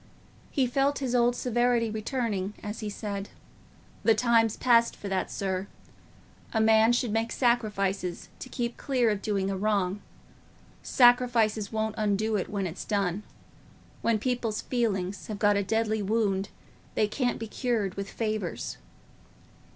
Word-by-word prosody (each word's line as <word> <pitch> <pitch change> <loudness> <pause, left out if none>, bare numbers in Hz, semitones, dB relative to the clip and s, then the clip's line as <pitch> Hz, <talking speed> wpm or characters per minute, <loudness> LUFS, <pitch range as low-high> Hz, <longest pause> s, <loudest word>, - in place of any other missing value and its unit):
He 270 -4 +1
felt 275 +3 +1
his 260 -3 -2
old 245 0 +3
severity 240 -2 +1
returning 215 -3 -2
as 210 +1 -5
he 215 - -4
said, 200 -1 -5 0.7
"The 225 - +4
time's 225 -1 +3
past 235 -2 +4
for 205 - -8
that, 190 -1 -1
sir. 190 0 -2 0.9
A 220 - +2
man 220 +1 +5
should 240 -2 +1
make 225 +1 0
sacrifices 200 -7 0
to 255 - -8
keep 235 -2 -3
clear 250 -5 +1
of 205 -1 -2
doing 195 -3 -1
a - - -1
wrong; 200 -1 0 0.8
sacrifices 240 -4 +3
won't 220 -1 -1
undo 215 +1 +1
it 195 - -1
when 200 -2 -2
it's 175 0 -5
done. 200 -2 -1 0.8
When 230 -1 +2
people's 235 -2 -2
feelings 200 -6 -1
have 215 - -4
got 205 0 +3
a 200 - +2
deadly 220 +1 0
wound, 200 -2 0 0.5
they 215 - +3
can't 245 +3 -1
be 225 - -5
cured 220 -4 -1
with 200 0 -5
favours." 215 -5 -3
220 Hz, 145 wpm, -28 LUFS, 200-235 Hz, 0.9 s, man